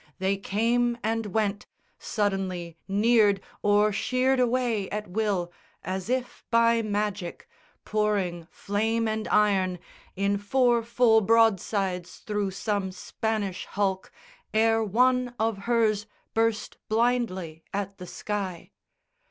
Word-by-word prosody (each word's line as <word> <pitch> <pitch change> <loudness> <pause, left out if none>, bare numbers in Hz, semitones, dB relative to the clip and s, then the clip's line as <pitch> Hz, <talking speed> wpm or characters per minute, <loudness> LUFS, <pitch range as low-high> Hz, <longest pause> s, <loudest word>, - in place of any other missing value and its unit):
They 190 +1 +1
came 235 +5 +1
and 225 0 -1
went, 205 0 -1 0.3
Suddenly 190 -5 -2
neared 205 0 +4 0.2
or 205 +1 +3
sheered 255 +4 +1
away 240 -5 +1
at 210 0 -3
will 185 -3 -1 0.3
As 190 +2 -4
if 255 0 -2
by 230 0 +4
magic, 205 -4 -3 0.4
pouring 200 -6 0
flame 225 +3 -1
and 220 0 -2
iron 195 -4 +2 0.4
In 200 +1 0
four 240 +3 +2
full 230 -1 +4
broadsides 195 -4 +1
thro' 210 -2 -1
some 195 0 -2
Spanish 205 -1 -3
hulk 195 -2 -1 0.4
Ere 225 0 +3
one 250 +3 +2
of 220 -2 0
hers 220 -3 +2 0.3
burst 225 -1 0
blindly 215 -8 0
at 200 0 -4
the 180 - -8
sky. 195 -5 -4
210 Hz, 110 wpm, -27 LUFS, 195-230 Hz, 0.4 s, neared